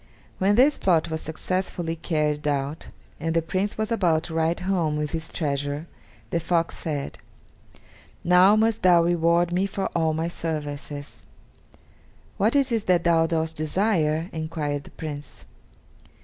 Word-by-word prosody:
When 195 +2 +3
this 270 +6 +4
plot 170 -3 +2
was 160 - -3
successfully 170 +1 -3
carried 150 -3 -1
out, 145 +1 -2 0.3
and 165 +1 -2
the 165 - +3
Prince 190 +5 -2
was 220 +1 -2
about 170 -8 +2
to 165 - -7
ride 165 +1 0
home 175 -5 0
with 150 -1 -2
his 160 -1 -4
treasure, 145 0 -2 0.5
the 170 - +1
fox 170 0 0
said, 145 -4 -4 1.0
"Now 180 +4 +6
must 220 0 +2
thou 175 -2 +6
reward 170 0 +2
me 185 +2 +1
for 195 0 -3
all 160 -2 +1
my 160 +1 -1
services." 145 -3 -5 1.1
"What 215 +6 +2
is 275 -2 +3
it 225 -3 -1
that 180 -2 +3
thou 165 -1 +3
dost 160 -1 -1
desire?" 160 -1 +1
enquired 155 -3 -3
the - - -12
Prince. 150 -2 -8
165 Hz, 150 wpm, -25 LUFS, 155-185 Hz, 1.1 s, Now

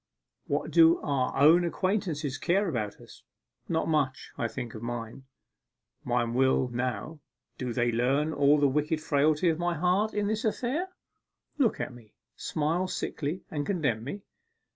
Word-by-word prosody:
What 145 +2 -1
do 165 +1 +6
our 135 -3 -1
own 160 +5 +7
acquaintances 170 -6 -1
care 195 +4 +1
about 110 - -3
us? - - -15 0.5
Not 160 -1 0
much. 145 -5 0
I 115 - -1
think 120 -1 -6
of 110 - -8
mine. 120 +2 -6 0.8
Mine 120 -1 0
will 130 0 +2
now 125 +5 -3 0.4
(do 125 -2 -2
they 120 0 +1
learn 135 +7 +1
all 145 +1 +4
the 145 - +4
wicked 150 +3 0
frailty 155 +2 +2
of 160 0 0
my 175 0 0
heart 185 +7 +1
in 210 0 +1
this 215 +1 -1
affair) 255 - -1 0.7
look 245 -6 +2
at - - -3
me, 115 -3 -16 0.2
smile 165 +5 -1
sickly, 160 -1 -3
and 145 -2 -2
condemn 145 - -1
me. 195 - -6
150 Hz, 155 wpm, -28 LUFS, 125-175 Hz, 0.8 s, own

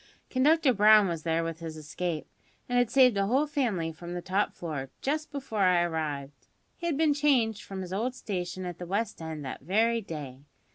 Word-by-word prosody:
Conductor 290 +1 +4
Brown 210 -1 +6
was 170 -3 -3
there 165 +1 0
with 165 0 -4
his 160 -1 -6
escape, 155 +1 -4 0.4
and 245 0 +2
had 245 -2 +2
saved 250 -3 +5
a 195 0 +2
whole 265 +7 +3
family 235 - -1
from 170 +2 -8
the 175 - -3
top 195 +2 0
floor, 145 -6 -5
just 305 +3 -2
before 270 -7 -4
I 180 -3 +4
arrived. 150 -4 -4 0.3
He 340 - -4
had 315 -5 0
been 310 -1 +4
changed 260 -7 +2
from 195 -1 -7
his 185 0 -6
old 240 +6 -1
station 185 -4 -4
at 175 -2 -6
the 175 - -6
West 205 +1 -2
End 160 -3 -5
that 130 - -6
very 225 +5 +2
day. 145 -9 -7
195 Hz, 200 wpm, -29 LUFS, 165-245 Hz, 0.4 s, Brown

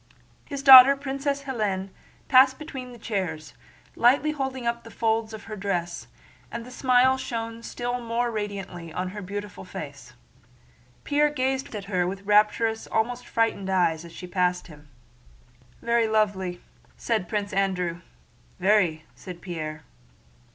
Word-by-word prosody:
His 280 -2 -6
daughter, 270 0 +11
Princess 280 0 -3
Hélène, 210 -8 -2 0.4
passed 260 0 +6
between 265 -5 -8
the 240 - -11
chairs, 180 -9 -4 0.4
lightly 270 +6 +4
holding 265 -4 -4
up 235 0 -1
the 230 - -11
folds 225 -1 0
of 220 -1 -9
her 215 - -7
dress, 180 -4 -3 0.4
and 230 - -6
the 250 - -11
smile 255 0 +3
shone 230 -1 -5
still 245 +1 -4
more 235 +1 -1
radiantly 195 -6 -5
on 180 +3 -3
her 205 +2 -7
beautiful 205 +2 -6
face. 140 -8 -9 0.9
Pierre 295 0 +2
gazed 265 -2 -2
at 200 -2 -5
her 180 -3 0
with 195 +2 -5
rapturous, 210 +2 +2
almost 245 +2 -1
frightened, 225 -4 0
eyes 170 -4 +1
as 170 - -11
she 180 - -9
passed 180 -1 0
him. 150 -3 -15 0.9
"Very 235 -1 +2
lovely," 195 -5 0 0.4
said 215 -7 -1
Prince 205 -1 -2
Andrew. 180 -3 -1 0.6
"Very," 180 -5 +2
said 180 -2 -10
Pierre. 155 -4 -6
215 Hz, 140 wpm, -25 LUFS, 180-245 Hz, 0.9 s, daughter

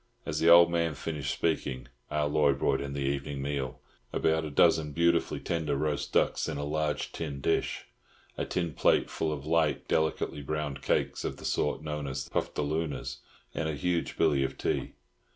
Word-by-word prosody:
As 75 +1 -2
the 85 - +4
old 85 0 +8
man 85 -2 +1
finished 70 -2 -3
speaking, 70 -6 -1 0.2
Ah 75 0 0
Loy 75 -1 +3
brought 70 0 +1
in 70 0 -4
the 70 - -3
evening 70 0 -2
meal—about 70 +3 -2
a - - -4
dozen 75 +1 +3
beautifully 85 +1 +2
tender 80 -4 -1
roast 75 0 -1
ducks - - +2
in - - -3
a 70 - -3
large 75 0 -1
tin 70 - -5
dish, 80 +4 0 0.5
a - - -2
tin 85 -4 -2
plate - - +3
full 80 - -1
of 75 -2 -5
light, 80 -1 +1
delicately 80 -2 0
browned 75 -1 -3
cakes - - 0
of - - -3
the - - -10
sort - - 0
known 75 -2 -3
as 65 0 -4
"puftalooners," 75 +1 -2 0.4
and 80 -1 -1
a 75 - -2
huge 85 +2 -1
billy 70 -2 +3
of 65 0 -3
tea. - - -1
75 Hz, 175 wpm, -29 LUFS, 70-80 Hz, 0.5 s, old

